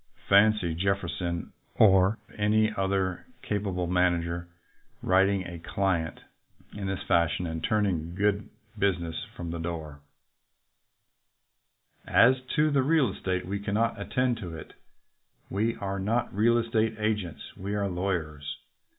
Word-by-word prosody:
Fancy 100 -4 +4
Jefferson 90 -1 -2 0.2
or 95 0 +5 0.2
any 110 +1 +2
other 95 -2 -1 0.2
capable 95 -4 -1
manager 85 -1 +1 0.6
writing 95 0 +3
a 85 -1 -7
client 85 -1 -1 0.5
in 100 -2 -4
this 95 -1 -3
fashion 85 +1 +2
and 80 -1 -4
turning 90 -6 0
good 100 +1 +1 0.3
business 90 -5 0 0.2
from 85 -1 -5
the 85 - -4
door: 80 -3 -5 2.1
As 125 +2 +5
to 150 0 +3
the 140 -2 +3
real 140 -4 +3
estate, 90 -2 -2
we 100 +2 -3
cannot 105 +3 0
attend 125 -2 0
to 85 -7 -6
it. - - -11 0.8
We 110 +4 0
are 100 0 -3
not 110 +5 0
real 115 +4 +3
estate 115 -1 +1
agents. 105 -6 -3
We 100 +2 -4
are 100 -1 0
lawyers. 80 -6 -3
95 Hz, 125 wpm, -28 LUFS, 85-105 Hz, 2.1 s, or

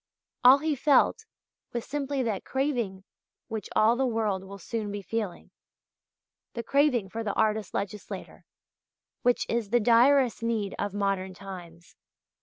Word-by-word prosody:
All 255 +2 +9
he 310 +2 -1
felt 295 - +3 0.5
was 235 -1 -3
simply 280 -1 -2
that 215 -5 -2
craving 245 -9 -2 0.5
which 220 -3 -5
all 220 +2 +5
the 265 - 0
world 215 -5 -1
will 195 +1 -9
soon 210 +2 -4
be 205 0 -5
feeling 210 -1 -4 1.0
the 235 - -4
craving 260 -4 +2
for 225 +4 -4
the 205 -2 -2
artist 215 -3 0
legislator, 200 +1 -5 0.8
which 245 -1 +2
is 230 -3 -1
the 240 +3 +3
direst 245 +2 +4
need 225 -4 -1
of 205 -1 -2
modern 195 -2 -1
times. 175 -3 -11
225 Hz, 140 wpm, -28 LUFS, 200-245 Hz, 1.0 s, All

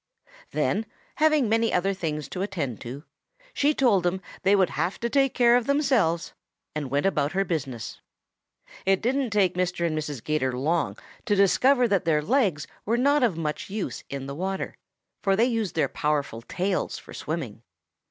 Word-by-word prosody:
Then, 215 +1 0 0.3
having 305 -5 +4
many 225 +1 +2
other 195 +2 +1
things 155 -6 -3
to 185 - -4
attend 165 - -3
to, 130 +4 -7 0.5
she 290 -4 +2
told 230 -8 +4
them 175 +2 0 0.2
they 195 +2 +4
would 190 -3 +3
have 180 - -2
to 235 0 -1
take 270 -2 +2
care 240 -1 +5
of 245 -1 +1
themselves, 260 - +2 0.4
and 150 -3 -3
went 145 +5 0
about 150 -5 +1
her 195 +1 +1
business. 135 - -4 0.8
"It 195 0 +3
didn't 260 +2 0
take 200 -4 +2
Mr. 180 -1 -1
and 160 -2 0
Mrs. 150 -5 -4
'Gator 130 -5 0
long 145 - 0 0.3
to 210 -4 +2
discover 245 +6 +4
that 195 -5 +1
their 155 -2 +2
legs 195 - +1 0.2
were 230 +3 +1
not 285 +4 +3
of 225 -10 +2
much 155 +1 -3
use 205 0 -4
in 135 -1 -5
the 140 - -5
water, 190 +5 -3 0.5
for 195 -1 +2
they 225 +4 +4
used 225 -7 -1
their 160 - +2
powerful 145 -6 -1
tails 185 +9 -2
for - - -12
swimming. - - -5
190 Hz, 175 wpm, -26 LUFS, 150-230 Hz, 0.8 s, care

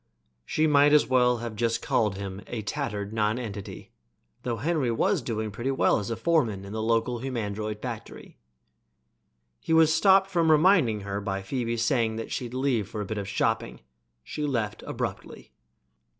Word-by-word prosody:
She 155 - +1
might 145 -1 +5
just 150 0 +6
as - - -17
well 125 -1 +4
have 115 -2 -6 0.2
called 105 -4 0
him 100 0 -6
a 115 -3 -5
tattered 100 0 -3
nonentity, 110 -2 -3 0.5
though 120 -2 -2
Henry 145 +2 0
was 115 - +1
doing 110 -2 -3
pretty 120 +6 -3
well 135 - +2
as 105 - -5
a 115 - -1
foreman 115 - 0
in 100 - -8
the 110 - -2
local 115 +2 0
humandroid 110 -4 -4
factory. 120 -4 -8 1.2
He - - -2
was 160 -1 +5
stopped 195 +3 +4
from 170 -3 +2
reminding 155 - +4
her 100 0 -4
by 95 -1 -3
Phoebe's 115 +1 -2
saying 115 -4 +1
that 115 - -6
she'd 125 -1 -4
leave 125 -6 0
for 110 -2 -5
a - - -3
bit 110 +1 -4
of 100 - -5
shopping. 105 - -1 0.4
She 150 - -5
left 120 -7 -2
abruptly. - - -6
115 Hz, 165 wpm, -27 LUFS, 105-135 Hz, 1.2 s, just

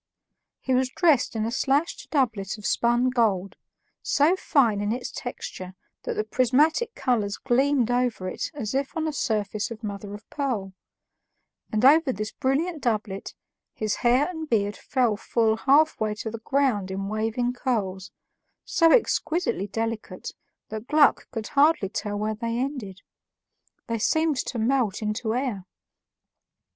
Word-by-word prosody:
He 260 - -1
was 255 0 +2
dressed 290 -5 +2
in 220 -1 0
a 230 - -2
slashed 280 +5 0
doublet 220 - 0
of 210 - -11
spun 240 +2 +2
gold, 205 -6 +1 0.5
so 300 +6 +3
fine 235 - +2
in 205 +1 -1
its 245 +2 -3
texture 185 -6 -7 0.3
that - - -4
the 215 - 0
prismatic 290 - +2
colors 210 -5 0
gleamed 265 -1 +2
over 245 -6 0
it - - -3
as 220 -6 -4
if 275 +3 -2
on 320 0 0
a 310 - -2
surface 215 -4 -1
of 230 0 -9
mother 205 -1 -5
of 205 - -13
pearl; 230 -10 -2 1.0
and 215 +3 +1
over 300 0 +6
this 215 -2 -4
brilliant 300 +5 -1
doublet 215 -4 -2 0.4
his 215 -1 -1
hair 250 +4 +3
and 320 -4 -6
beard 205 -3 +1
fell 245 -6 0
full 220 +1 +1
halfway 270 -5 +3
to 220 +1 -5
the 230 - -6
ground 230 -6 0
in 195 +1 -3
waving 225 +4 -1
curls, 195 -7 -2 0.5
so 330 -2 +4
exquisitely 325 - +1
delicate 225 -3 -4 0.4
that 220 +2 -6
Gluck 300 -1 +4
could 225 -3 -5
hardly 285 -8 +3
tell 205 -1 -3
where 215 +1 -1
they 230 +2 -3
ended; 245 -7 -4 0.8
they 230 -2 -2
seemed 315 +5 +2
to 255 - -3
melt 230 -3 +1
into 220 +2 -1
air. 245 -8 -2
235 Hz, 150 wpm, -25 LUFS, 210-275 Hz, 1.0 s, over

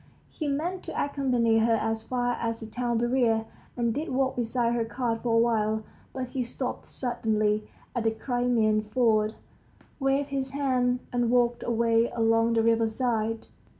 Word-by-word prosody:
He 310 - -4
meant 335 +6 -2
to - - -4
accompany 250 -5 +2
her 225 +1 +3
as 225 0 -1
far 245 +1 -1
as 230 -1 -2
the 225 - -6
town 240 +1 -2
barrier, 235 -2 +2 0.3
and 235 -1 +1
did 305 +7 -3
walk 260 0 0
beside 235 0 0
her 235 -1 +1
cart 230 0 -2
for 235 -2 +1
a - - +5
while, 220 -2 +2 0.3
but 255 -2 -4
he 260 - -2
stopped 245 +1 -4
suddenly 215 -4 -1 0.3
at 240 -2 -1
the - - +5
Crimean 230 -2 +1
ford, 215 -1 +1 0.6
waved 275 +1 +1
his 270 -1 -3
hand, 250 -3 +1
and 240 -1 +1
walked 240 -1 +2
away 230 0 +2
along 225 0 +3
the 225 -1 +3
riverside. 225 0 +1
235 Hz, 160 wpm, -27 LUFS, 225-250 Hz, 0.6 s, a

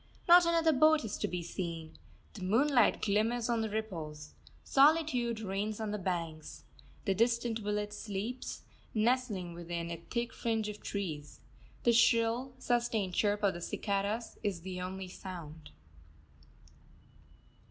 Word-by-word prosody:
Not 350 0 +8
another 330 -1 +4
boat 310 0 +5
is 210 - -3
to - - 0
be 175 -1 -3
seen. 165 -2 -5 0.3
The 205 - -9
moonlight 240 +6 +3
glimmers 225 +4 +1
on 235 -1 +2
the 220 - -1
ripples. 160 -9 -5 0.3
Solitude 270 -6 +3
reigns 205 +1 -2
on 215 -1 -2
the 210 - -2
banks. 165 -4 -4 0.4
The 195 - +2
distant 230 +2 +1
village 210 0 -2
sleeps, 210 +4 -5 0.3
nestling 215 -6 +1
within 170 0 -4
a 170 - -3
thick 235 -1 -2
fringe 225 -2 -1
of 210 0 -8
trees. 155 -8 -5 0.4
The 235 - +5
shrill, 230 +2 +3
sustained 235 -7 0
chirp 205 +2 +1
of 200 - +3
the 175 - -7
cicadas 200 +5 -2
is 200 -5 -2
the 180 0 -5
only 185 +1 -5
sound. 165 -5 -9
210 Hz, 135 wpm, -32 LUFS, 185-235 Hz, 0.4 s, Not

